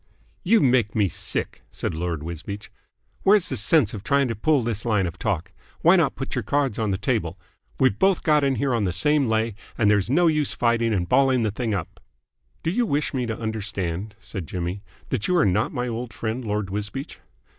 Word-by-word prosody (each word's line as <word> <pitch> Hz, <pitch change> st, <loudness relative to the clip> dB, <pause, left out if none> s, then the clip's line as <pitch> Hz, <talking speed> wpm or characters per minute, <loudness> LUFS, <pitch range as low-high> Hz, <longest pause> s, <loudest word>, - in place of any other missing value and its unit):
"You 220 Hz, +3 st, +4 dB
make 125 Hz, -5 st, +2 dB
me 105 Hz, -4 st, +2 dB
sick," -, -, -3 dB
said -, -, -3 dB
Lord 80 Hz, -2 st, -3 dB
Wisbeach. 85 Hz, +6 st, -7 dB, 0.5 s
"Where's 200 Hz, -2 st, +4 dB
the 130 Hz, -, -2 dB
sense 120 Hz, +2 st, +3 dB
of 105 Hz, -3 st, -6 dB
trying 140 Hz, 0 st, +2 dB
to 115 Hz, -, -2 dB
pull 140 Hz, +4 st, +2 dB
this 110 Hz, -2 st, -2 dB
line 105 Hz, -5 st, +1 dB
of 85 Hz, 0 st, -6 dB
talk. 90 Hz, -5 st, -2 dB, 0.3 s
Why -, -, +6 dB
not -, -, +2 dB
put -, -, -5 dB
your -, -, 0 dB
cards 140 Hz, -6 st, 0 dB
on 110 Hz, -2 st, 0 dB
the 95 Hz, -, 0 dB
table? -, -, -1 dB, 0.4 s
We've 130 Hz, -6 st, +3 dB
both 195 Hz, -2 st, +3 dB
got 150 Hz, -2 st, +3 dB
in 135 Hz, -1 st, +2 dB
here 130 Hz, +2 st, 0 dB
on 115 Hz, -4 st, +1 dB
the 90 Hz, -, -1 dB
same 145 Hz, -, +2 dB
lay, 110 Hz, 0 st, +1 dB, 0.2 s
and 105 Hz, -2 st, +4 dB
there's 100 Hz, 0 st, +2 dB
no 170 Hz, +7 st, +3 dB
use 150 Hz, -3 st, +2 dB
fighting 115 Hz, -1 st, +1 dB
and 90 Hz, -5 st, 0 dB
balling 130 Hz, +2 st, +3 dB
the 110 Hz, -, 0 dB
thing 110 Hz, 0 st, -2 dB
up." -, -, -5 dB, 0.6 s
"Do 165 Hz, -, 0 dB
you 235 Hz, +4 st, +1 dB
wish 145 Hz, -2 st, 0 dB
me 125 Hz, -3 st, -1 dB
to 115 Hz, -, -4 dB
understand," 105 Hz, -3 st, -3 dB
said 100 Hz, -6 st, -7 dB
Jimmy, 90 Hz, +3 st, -4 dB, 0.3 s
"that 110 Hz, -5 st, -1 dB
you 180 Hz, -, +2 dB
are 170 Hz, -, +4 dB
not 100 Hz, +3 st, +1 dB
my 125 Hz, 0 st, -2 dB
old 120 Hz, 0 st, -4 dB
friend, 115 Hz, +3 st, -3 dB
Lord 105 Hz, -3 st, -2 dB
Wisbeach?" 105 Hz, +7 st, -5 dB
110 Hz, 210 wpm, -24 LUFS, 100-135 Hz, 0.6 s, Why